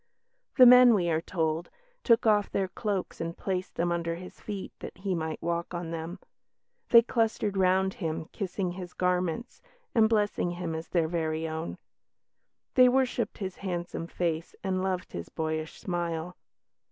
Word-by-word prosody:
The 255 - +10
men, 250 -1 +9
we 175 -4 +1
are 160 0 +1
told, 165 -1 -1 0.3
"took 230 -1 +4
off 210 -2 +4
their 195 -1 0
cloaks 195 0 -3
and 165 +1 -4
placed 185 -1 -3
them 175 +1 0
under 170 -1 -1
his 180 +2 -11
feet, 205 -3 -6
that - - -8
he 190 0 -2
might 160 -2 -3
walk 170 +1 -2
on 170 -1 -4
them; 165 +2 -5 0.7
they 235 -1 +8
clustered 225 -3 0
round 190 0 +3
him, 160 -3 -3
kissing 190 -2 -3
his 180 0 -8
garments, 180 +4 -1 0.3
and 220 -2 +5
blessing 210 -5 +1
him 175 -2 -4
as 160 +1 -5
their 170 -3 +1
very 160 -1 -1
own; 160 +1 -4 1.0
they 255 -1 +7
worshipped 250 -3 0
his 190 -3 -5
handsome 175 -3 -4
face 165 -2 -2
and 185 -1 0
loved 185 -1 -2
his 85 - -6
boyish 155 0 -3
smile." 175 -1 -3
180 Hz, 160 wpm, -29 LUFS, 165-200 Hz, 1.0 s, The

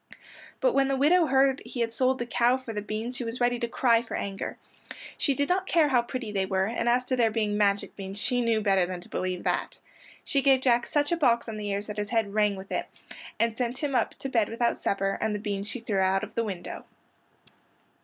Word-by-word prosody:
But - - +3
when 275 -1 +3
the 270 - +1
widow 325 +5 +4
heard 270 0 +3
he 240 +1 -5
had 230 0 -1
sold 260 +2 +2
the 240 - -3
cow 240 +1 +2
for 255 -3 -8
beans 215 +4 -4
she 245 - -3
was 230 +1 -5
ready 245 0 +1
to 235 - -1
cry 235 -1 +3
for 235 - -6
anger. 195 0 -4 0.6
She 280 - +1
did 285 +1 0
not 375 +1 0
care 320 -4 +3
how 250 -3 +4
pretty 240 -2 -5
they 195 -2 -1
were, 190 0 +1
and 230 +2 -1
as 250 +1 +2
to 255 - 0
their 235 -3 +3
being 215 -2 -1
magic 200 -1 +1
beans 195 0 -7
she 245 +3 0
knew 230 -2 +1
better 195 -3 +3
than 180 -1 -5
to - - -13
believe 185 -1 -3
that. - - -1 0.4
She 275 - +1
gave 265 -1 +4
Jack 240 -2 +2
such 290 +1 0
a 340 - +2
box 235 -7 +2
on 220 -1 -5
the 210 -1 -4
ears 200 +1 -2
that 210 0 -7
his 205 -1 -2
head 220 -3 0
rang 210 -1 +2
with 190 0 -10
it, - - -2 0.5
and 230 -1 +1
sent 245 +1 -2
him 285 -2 -1
up 255 - +1
to - - -6
bed 225 -5 +1
without 235 +1 +1
his - - -6
supper, 195 0 0
and 215 - 0
the - - -3
beans 200 -1 -3
she 250 - -3
threw 210 -4 -1
out 190 +1 +2
of 215 0 -7
the 230 - 0
window. 185 -5 -6
230 Hz, 245 wpm, -27 LUFS, 205-255 Hz, 0.6 s, widow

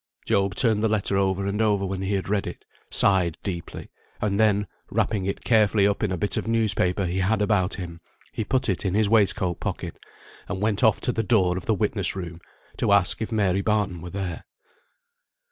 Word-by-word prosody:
Job 100 -2 +1
turned 110 -3 +3
the - - +4
letter 105 -2 0
over 95 0 +1
and 100 +2 -1
over 105 -3 +2
when 95 0 -3
he 95 +1 -1
had 95 - -3
read 100 0 0
it; - - -8 0.2
sighed 90 -5 +2
deeply; 85 -4 -6 0.3
and 100 -1 -1
then 105 -2 +3 0.2
wrapping 100 -4 0
it 100 - -3
carefully 110 -3 +3
up 100 0 +1
in 105 - 0
a 95 - -1
bit 100 +4 -1
of - - -2
newspaper 100 -4 +1
he 90 +2 -2
had 100 +3 +1
about 100 -2 +1
him, 85 -3 -7 0.3
he - - -3
put 130 +4 0
it 95 -4 -1
in 95 -1 -1
his 110 0 +3
waistcoat 100 -5 +2
pocket, - - -5 0.5
and - - -3
went 105 +2 0
off 110 -3 +4
to 125 - -1
the 115 - -1
door 95 -5 +2
of 95 - -6
the 110 - +2
witness 100 -3 0
room 85 -3 -7 0.4
to - - +1
ask 100 0 +3
if 110 - -3
Mary 100 -3 +1
Barton 100 -5 0
were 90 - -7
there. 95 -3 -5
100 Hz, 205 wpm, -25 LUFS, 95-105 Hz, 0.5 s, the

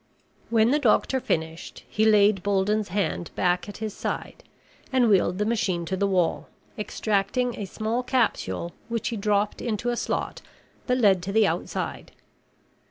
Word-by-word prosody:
When 230 +1 +4
the 295 - +3
doctor 260 +1 +2
finished, 160 -7 -3
he 215 - +1
laid 210 -2 +5
Bolden's 205 +2 +1
hand 185 -2 -2
back 180 +2 +1
at 205 - -8
his 215 -2 -4
side - - -5 0.5
and 255 -2 +4
wheeled 185 -3 +3
the 210 - 0
machine 195 -6 0
to 190 - -2
the 200 +1 +1
wall, 180 -3 0 0.3
extracting 215 +2 -1
a 205 - -3
small 220 +5 -2
capsule 225 - -1 0.2
which 230 -2 -2
he 235 - -3
dropped 205 0 0
into 235 0 -2
a 240 - 0
slot - - -3 0.5
that 250 -1 +2
led 200 -7 +4
to 190 +3 -4
the 220 +1 +4
outside. - - -3
210 Hz, 160 wpm, -25 LUFS, 190-230 Hz, 0.5 s, laid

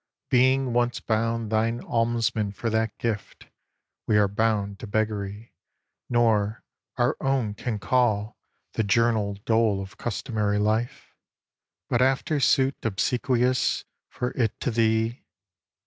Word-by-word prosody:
Being 130 0 +3
once 120 0 +1
bound 115 0 -1
thine 115 +2 +1
almsmen 115 -3 0
for 115 +2 -2
that 110 -1 0
gift, 110 -3 -4 0.6
We 105 - +3
are 105 -1 +4
bound 100 -1 0
to - - -7
beggary; 105 0 -3 0.6
nor 110 -3 +2 0.3
our - - +2
own 130 -6 0
can 110 +1 -3
call 110 +1 +1 0.4
The - - 0
journal 110 -1 +2
dole 110 -3 +2
of 95 +5 -8
customary 105 -3 -1
life, 110 +3 -1 0.7
But 120 - +1
after 135 +3 +2
suit 135 +1 +3
obsequious 125 +4 +1 0.2
for 125 - -3
't 115 -4 -1
to 125 - 0
thee. 110 +1 +1
115 Hz, 120 wpm, -25 LUFS, 105-120 Hz, 0.7 s, are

